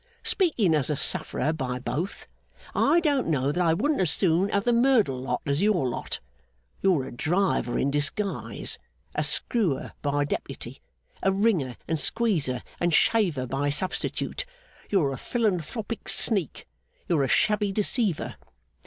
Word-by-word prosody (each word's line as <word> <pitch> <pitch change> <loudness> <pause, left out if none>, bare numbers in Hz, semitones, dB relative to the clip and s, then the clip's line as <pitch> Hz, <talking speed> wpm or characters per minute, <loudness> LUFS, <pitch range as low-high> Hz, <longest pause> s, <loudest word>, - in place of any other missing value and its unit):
Speaking 250 - +2
as 150 -3 +2
a 150 - +1
sufferer 155 +2 0
by 130 -5 -3
both, 135 +10 -4 0.5
I 340 - +3
don't 290 -5 +1
know 140 -3 +1
that 180 +4 0
I 165 -1 +3
wouldn't 290 - +1
as 180 - +2
soon 180 +4 +2
have 200 0 +1
the 240 - +3
Merdle 235 - +3
lot 130 - -2
as 140 +2 0
your 200 -10 +2
lot. 120 - -4 0.6
You're 180 -8 +3
a - - -8
driver 160 -1 0
in 140 - +1
disguise, 145 +8 -2 0.3
a - - 0
screwer 195 - 0
by 145 0 0
deputy, - - -5 0.4
a 195 - +3
wringer, 190 - +1
and 160 -1 0
squeezer, 160 - +1 0.2
and 175 0 +1
shaver 175 - +2
by 135 +3 -1
substitute. 185 - -2 0.5
You're 155 -9 +2
a - - -5
philanthropic 220 - -2
sneak. 195 - +1 0.4
You're 165 -5 +2
a - - +1
shabby 210 +5 +2
deceiver! 210 - -1
175 Hz, 145 wpm, -26 LUFS, 140-210 Hz, 0.6 s, I